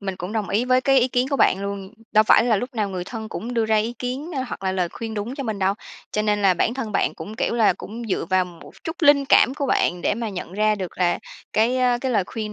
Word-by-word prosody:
mình 195 -2 -4
cũng 185 +3 -6
đồng 215 -4 -2
ý 225 +5 +1
với 255 0 +3
cái 270 0 +4
ý 245 - +2
kiến 250 +1 0
của 275 - +1
bạn 190 - +3
luôn. 200 0 -5 0.2
Đâu 215 0 +5
phải - - +5
là 230 -3 +3
lúc 245 +5 -4
nào 210 -3 0
người 185 -2 -4
thân 220 +2 -7
cũng 240 +3 -5
đưa 230 -1 +2
ra 220 0 +2
ý 220 +3 0
kiến, 260 +6 -4
a, 260 - 0
hoặc - - -7
là 190 - +1
lời 180 -2 0
khuyên 225 +2 -6
đúng 215 +5 -4
cho 275 - -4
mình 220 -4 -3
đâu. 195 +1 +1 0.4
Cho 210 - 0
nên 210 -1 +1
là 190 -2 +5
bản 225 +7 0
thân 230 -6 -4
bạn - - +1
cũng, 210 - -8
kiểu 235 - 0
là, 225 -5 +4
cũng 220 +6 -8
dựa 190 - -1
vào 185 0 +3
một 175 -2 -13
chút 320 - -4
linh 285 -2 +6
cảm 265 - +5
của 280 -1 -2
bạn 175 -8 +1
để - - +1
mà 230 0 -3
nhận 180 -3 -6
ra 215 +2 +2
được 185 -4 -6
là 175 -2 +2 0.3
cái, 230 +4 +2
a, 245 -1 +2
cái 260 +1 -2
lời 200 -5 +2
khuyên 215 -2 -5
220 Hz, 290 wpm, -23 LUFS, 195-245 Hz, 0.4 s, linh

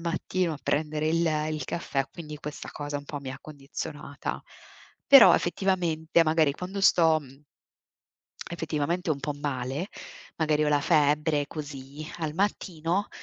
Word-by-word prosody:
mattino 170 +1 -1
a 150 - -6
prendere 155 +1 0
il 165 +1 +2 0.2
il 155 -1 -3
caffè, 140 -5 -2
quindi 155 -3 -8
questa 150 0 -7
cosa 145 -1 -4
un 145 - -11
po' 145 0 -5
mi 135 -1 -6
ha 135 - -7
condizionata. 145 0 -6 0.6
Però 275 -4 +9
effettivamente 175 -3 +1
magari 155 -2 +3
quando 185 +5 -5
sto, 165 -4 +5
mhmm, 135 0 -15 1.1
effettivamente 165 +1 -2
un 140 - -2
po' 145 +1 -3
male, 145 +3 -3 0.5
magari 155 -1 +2
ho 150 - +2
la 145 -1 +3
febbre 150 -1 +2
così, 145 -1 -7
al 155 -2 -2
mattino, 185 0 -1
155 Hz, 140 wpm, -27 LUFS, 145-170 Hz, 1.1 s, Però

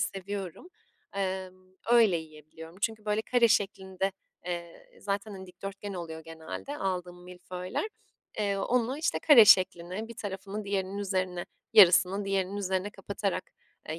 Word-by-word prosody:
seviyorum. 195 - -4 0.5
Emm, 185 -1 -4 0.2
öyle 230 -6 +6
yiyebiliyorum. 160 +1 -11
Çünkü, 215 0 -2
böyle, 210 +1 0
kare 240 0 +3
şeklinde, 195 -2 0 0.3
eee, 170 -1 -6
zaten, 200 +1 -3
hani, 190 -1 -9
dikdörtgen 195 +2 -7
oluyor 165 -3 -6
genelde 165 - -7
aldığım 180 -2 -3
milföyler. 180 - -5 0.5
Eee, 200 -2 +1
onu, 245 +6 0
işte, 330 +2 0
kare 270 -8 +8
şekline, 185 +1 +4
bir 235 - -10
tarafını 200 +1 -5
diğerinin 195 0 -2
üzerine, 185 -3 -2 0.3
yarısını 195 -1 +7
diğerinin 195 0 -1
üzerine 190 0 -1
kapatarak, 195 -1 -4 0.4
eee, 160 +1 -4
190 Hz, 130 wpm, -29 LUFS, 180-205 Hz, 0.5 s, kare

